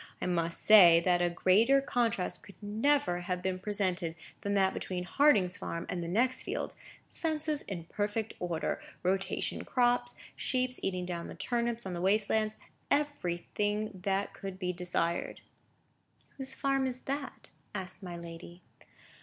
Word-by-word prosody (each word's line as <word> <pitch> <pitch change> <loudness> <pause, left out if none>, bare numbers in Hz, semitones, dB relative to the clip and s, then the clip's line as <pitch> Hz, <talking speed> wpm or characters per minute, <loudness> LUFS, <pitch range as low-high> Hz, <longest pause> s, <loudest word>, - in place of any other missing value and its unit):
I - - -3
must 170 -2 0
say 180 -6 +9
that 175 -1 +3
a 175 - +3
greater 210 +10 +4
contrast 235 -8 -1
could 200 - -14
never 220 0 +1
have 180 0 -3
been 185 -1 -1
presented 185 -4 -1 0.3
than 200 0 -1
that 190 -1 +3
between 180 -1 -3
Harding's 195 -5 +4
farm 170 - -4
and 175 - -2
the 170 - -4
next 250 +8 +2
fields—fences 315 -7 -3
in 180 -4 -6
perfect 205 +5 -2
order, 170 -2 -2 0.2
rotation 190 +1 -1
crops, 245 -1 +1 0.2
sheep 255 -1 0
eating 185 -1 -1
down 170 -1 -4
the - - -8
turnips 235 -2 -1
on 190 - -4
the 175 - -4
waste 200 +2 +3
lands—everything 215 -3 -1
that 195 +1 0
could 195 -2 -7
be 180 -1 -2
desired." 175 -1 -1 1.0
"Whose 265 -1 -3
farm 270 -1 +1
is 255 0 -3
that?" 275 0 -5 0.2
asked 185 0 -3
my 175 -2 -6
lady. 170 +1 -10
195 Hz, 145 wpm, -31 LUFS, 180-245 Hz, 1.0 s, say